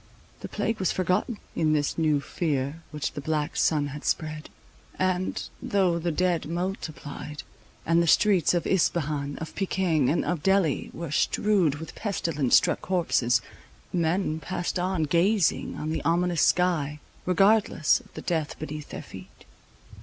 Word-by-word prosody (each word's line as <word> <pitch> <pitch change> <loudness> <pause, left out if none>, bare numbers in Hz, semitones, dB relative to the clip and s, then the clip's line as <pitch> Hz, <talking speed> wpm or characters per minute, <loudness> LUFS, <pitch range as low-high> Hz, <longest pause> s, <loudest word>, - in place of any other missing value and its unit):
The - - -7
plague 225 0 -2
was 190 - +1
forgotten, 185 +5 0 0.2
in 155 -1 +2
this 145 -1 0
new 155 -3 +2
fear 145 -1 -2
which 150 -2 -3
the 145 - -6
black 150 0 -1
sun 145 -2 +2
had 145 +1 -8
spread; 155 -1 -2 0.5
and, 185 0 -1
though 185 -4 +1
the 170 +1 -1
dead 175 0 0
multiplied, 160 -4 -5 0.4
and 165 +1 +3
the 170 - +1
streets 185 -1 +4
of 175 - 0
Ispahan, 150 -6 0
of 160 - -7
Pekin, 180 -7 +1
and 165 - +1
of 175 -3 -1
Delhi 190 -4 +2
were 170 -3 -6
strewed 185 -2 +2
with 160 +2 -8
pestilence 165 - 0
struck - - +3
corpses, 125 -10 +1 0.5
men 170 -1 0
passed 175 +2 -3
on, 180 -2 0
gazing 175 +5 +2
on 155 +1 -3
the 160 - -2
ominous 175 0 +1
sky, 155 -5 +2 0.3
regardless 195 -6 +3
of - - -20
the - - -7
death 160 -4 -2
beneath 150 -1 -6
their - - -7
feet. - - -13
165 Hz, 150 wpm, -26 LUFS, 150-185 Hz, 0.5 s, streets